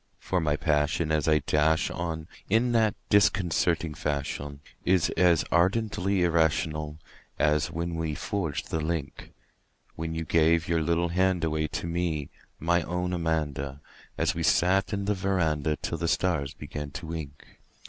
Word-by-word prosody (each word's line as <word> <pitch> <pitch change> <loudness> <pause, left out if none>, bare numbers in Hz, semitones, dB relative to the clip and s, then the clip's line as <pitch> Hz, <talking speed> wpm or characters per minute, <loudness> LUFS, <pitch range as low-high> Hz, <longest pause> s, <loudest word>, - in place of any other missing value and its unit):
For 95 - -1
my 75 -2 +1
passion 75 +2 +1
as 80 +1 +1
I 75 -2 +3
dash 80 +2 +2
on 80 -2 -4 0.2
in 115 +4 +3
that 110 -3 +3 0.2
disconcerting 85 -5 +2
fashion 70 -1 -3 0.2
Is 90 -2 +2
as 85 -2 +3
ardently 95 +1 +2
irrational 80 -2 +1 0.4
as 75 +1 +2
when 85 +1 -3
we 80 -2 -2
forged 85 -3 -3
the 80 - 0
link 80 -3 -4 0.6
When 80 0 -4
you 80 0 -3
gave 85 +1 +3
your 85 -1 +1
little 85 +2 +1
hand 95 0 +1
away 80 -1 0
to - - -4
me, 85 -4 -2 0.3
my 85 +2 +2
own 90 +2 -2
Amanda 75 -5 -2 0.4
An - - +1
we - - -4
sat 95 +4 +3
'n 100 -1 -2
the 105 - +2
veranda 80 -6 0
till 80 - -4
the 85 - -1
stars 80 -7 0
began 75 -1 -6
to 75 - -7
wink. 80 -3 -8
80 Hz, 150 wpm, -27 LUFS, 75-90 Hz, 0.6 s, I